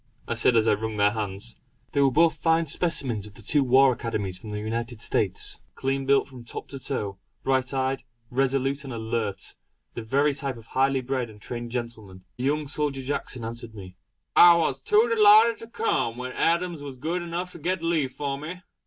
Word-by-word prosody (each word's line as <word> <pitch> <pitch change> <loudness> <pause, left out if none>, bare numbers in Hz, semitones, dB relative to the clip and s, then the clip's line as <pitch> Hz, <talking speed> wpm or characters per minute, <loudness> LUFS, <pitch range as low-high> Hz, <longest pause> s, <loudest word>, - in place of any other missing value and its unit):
I - - -1
said 125 - +3
as 110 0 +3
I - - +5
wrung 110 +1 -3
their 100 0 +4
hands. 105 +1 -4 0.3
They 140 - +2
were 135 - +5
both 165 +5 +4
fine 165 0 +2
specimens 135 - 0
of 105 - -15
the 115 - -9
two 140 +7 +3
war 130 +1 +5
Academies 100 -6 -4
of 110 - -7
the 105 - -4
United 115 +2 -4
States. - - +1 0.2
Clean 135 0 -2
built 140 0 +4
from 130 -3 -12
top 115 - -7
to 135 - -7
toe; 105 -8 -4 0.2
bright 130 -1 +1
eyed, 135 0 -1 0.3
resolute 135 +2 +1
and 135 - -7
alert; 110 -3 -2 0.4
the - - -5
very 140 +6 +2
type 135 -3 -3
of 115 - -13
highly 135 +2 +1
bred 130 -2 -2
and 105 -1 -14
trained 120 +1 -6
gentlemen. 115 -6 -6
The 125 - -3
young 150 +1 0
soldier 145 -2 -1
Jackson 130 -3 -3
answered 115 -1 -6
me: 95 -3 -10 0.4
"I 175 -1 +9
was 140 -5 0
too 215 - +4
delighted 215 +2 +7
to 230 - -10
come, 235 - -1
when 130 0 -5
Adams 170 +1 0
was 140 -2 -8
good 165 +7 -2
enough 175 +1 -4
to 170 - -11
get 175 +2 -2
leave 160 -6 +1
for 140 0 -3
me." 180 +5 -7
130 Hz, 200 wpm, -26 LUFS, 115-150 Hz, 0.4 s, I